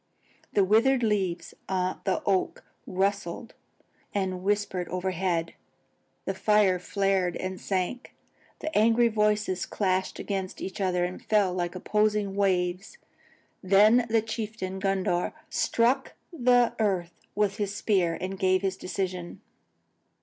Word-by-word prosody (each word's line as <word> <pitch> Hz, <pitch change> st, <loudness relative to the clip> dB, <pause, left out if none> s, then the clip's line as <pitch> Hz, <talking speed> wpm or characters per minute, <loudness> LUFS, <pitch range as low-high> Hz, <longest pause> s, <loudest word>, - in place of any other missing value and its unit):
The 200 Hz, -, +4 dB
withered 235 Hz, +6 st, +3 dB
leaves 195 Hz, -5 st, -1 dB, 0.2 s
on 185 Hz, -1 st, -1 dB
the 190 Hz, -, 0 dB
oak 195 Hz, -2 st, 0 dB, 0.2 s
rustled 195 Hz, +2 st, -2 dB, 0.6 s
and 190 Hz, -2 st, -1 dB
whispered 195 Hz, -2 st, -1 dB
overhead. 180 Hz, -2 st, -1 dB, 0.7 s
The -, -, -1 dB
fire 210 Hz, -4 st, +3 dB
flared 190 Hz, -1 st, 0 dB
and 185 Hz, 0 st, -5 dB
sank 195 Hz, +6 st, -2 dB
again. -, -, -29 dB, 0.5 s
The 315 Hz, -, -4 dB
angry 230 Hz, +2 st, +4 dB
voices 210 Hz, -3 st, 0 dB
clashed 190 Hz, -2 st, -1 dB
against 190 Hz, -2 st, -4 dB
each 190 Hz, +1 st, -5 dB
other 180 Hz, -2 st, +1 dB
and 180 Hz, +1 st, -6 dB
fell 205 Hz, -4 st, +2 dB
like 175 Hz, 0 st, -2 dB
opposing 210 Hz, 0 st, 0 dB
waves. 185 Hz, -, 0 dB, 0.6 s
Then 215 Hz, +5 st, +5 dB
the 225 Hz, -1 st, +2 dB
chieftain 215 Hz, -4 st, -4 dB
Gundhar 190 Hz, -2 st, 0 dB, 0.2 s
struck 250 Hz, +4 st, +1 dB, 0.2 s
the 245 Hz, -5 st, +3 dB
earth 185 Hz, -5 st, 0 dB, 0.2 s
with 205 Hz, -1 st, +1 dB
his 205 Hz, -2 st, -2 dB
spear 185 Hz, -6 st, +1 dB
and 190 Hz, +1 st, -5 dB
gave 185 Hz, 0 st, +2 dB
his 190 Hz, -1 st, -1 dB
decision. 185 Hz, -2 st, -4 dB
195 Hz, 125 wpm, -27 LUFS, 185-210 Hz, 0.7 s, Then